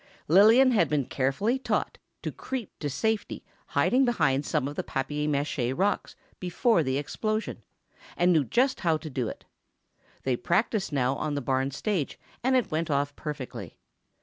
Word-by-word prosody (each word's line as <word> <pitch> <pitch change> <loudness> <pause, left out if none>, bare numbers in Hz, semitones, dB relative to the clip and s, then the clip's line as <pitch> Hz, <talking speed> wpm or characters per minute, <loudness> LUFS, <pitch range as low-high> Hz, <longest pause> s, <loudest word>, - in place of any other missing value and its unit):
Lillian 220 - +7
had 175 - +3
been 145 -2 +1
carefully 140 - 0
taught - - -1 0.2
to - - -2
creep 260 -6 -5
to 145 - -2
safe 220 - 0 0.4
hiding 260 +2 +3
behind 145 - +1
some 130 - 0
of 145 - -5
the - - -1
papier 145 +3 -2
mâché 140 -3 -1
rocks 200 +2 0 0.2
before 180 +3 +2
the 130 -2 0
explosion, 215 +9 -2 0.6
and 175 +1 +4
knew 155 -3 +4
just 255 - +1
how 165 -3 +2
to 155 0 -8
do 125 -3 -1
it. - - -8 0.8
They 130 -2 +1
practiced 195 - 0
now 130 -2 +1
on 150 -1 -2
the - - 0
barn 135 0 0
stage, 165 +2 -2 0.3
and 260 +1 +3
it 245 -7 +1
went 160 +1 -1
off 140 0 0
perfectly. 150 -4 -6
155 Hz, 165 wpm, -27 LUFS, 140-215 Hz, 0.8 s, Lillian